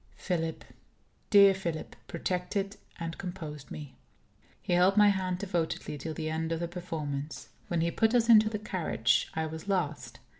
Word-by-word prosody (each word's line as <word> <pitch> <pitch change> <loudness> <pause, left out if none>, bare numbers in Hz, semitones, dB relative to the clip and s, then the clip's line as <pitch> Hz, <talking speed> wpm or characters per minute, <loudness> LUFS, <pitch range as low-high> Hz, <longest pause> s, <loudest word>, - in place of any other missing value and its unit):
Philip, 165 -3 -2 0.7
dear 200 -2 +8
Philip, 170 -4 -4
protected 185 +4 -2 0.2
and 165 -1 -5
composed 160 -6 -6
me. 145 -4 -8 0.7
He - - -2
held 185 +3 +4
my 210 -1 +8
hand 185 -2 0
devotedly 175 -6 -2
till 160 +3 -5
the 155 0 -3
end 160 +1 -2
of 165 - -1
the 170 - -2
performance. 155 -5 -5 0.2
When 170 -2 0
he 170 +1 +1
put 225 +6 +2
us 230 -1 +4
into 220 -2 +7
the 215 - -2
carriage, 170 - +1
I 160 0 0
was 160 +4 -7
last. 165 -7 -1
175 Hz, 160 wpm, -30 LUFS, 160-195 Hz, 0.7 s, dear